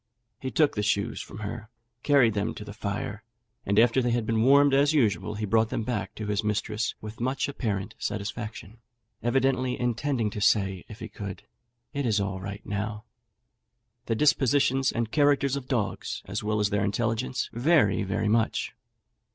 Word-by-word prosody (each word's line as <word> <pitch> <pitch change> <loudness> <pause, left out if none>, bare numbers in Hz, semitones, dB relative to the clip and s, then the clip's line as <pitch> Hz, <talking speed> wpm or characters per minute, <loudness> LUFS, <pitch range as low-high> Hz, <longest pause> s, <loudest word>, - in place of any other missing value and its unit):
He 130 - -3
took 145 +5 +3
the 105 - -1
shoes 100 -1 0
from 100 - -9
her, 105 +1 -6 0.3
carried 135 -6 +4
them 100 0 -1
to 105 - -8
the 105 - -8
fire, 105 0 -4 0.4
and 100 +1 +1
after 120 +3 +5
they 125 - 0
had 120 -1 0
been 110 0 +1
warmed 140 +3 +6
as 145 +2 +4
usual, 105 - +1
he 105 0 -2
brought 110 +2 +2
them 115 - -2
back 105 -4 -3
to 110 - -5
his 105 0 -1
mistress 105 +1 -1
with 110 +1 -8
much 130 +3 0
apparent 105 -9 -3
satisfaction, 105 +1 -5 0.4
evidently 130 +1 +1
intending 120 -1 0
to 105 - -5
say, 95 -3 +2
if 110 - -11
he - - -5
could, 100 -3 -7 0.5
"It 140 -3 -1
is 105 -2 +2
all 95 -1 -2
right 100 +2 -7
now." 105 +1 -3 1.0
The 115 - +1
dispositions 135 -1 +3
and 115 -2 -2
characters 145 -2 +3
of 135 -2 -5
dogs, 105 -8 -2
as 100 +3 -4
well 105 0 0
as 105 0 +1
their 100 -1 +1
intelligence, 115 +4 -1
vary 120 - +3
very 105 +2 -1
much. 110 +1 +1
110 Hz, 175 wpm, -27 LUFS, 105-130 Hz, 1.0 s, warmed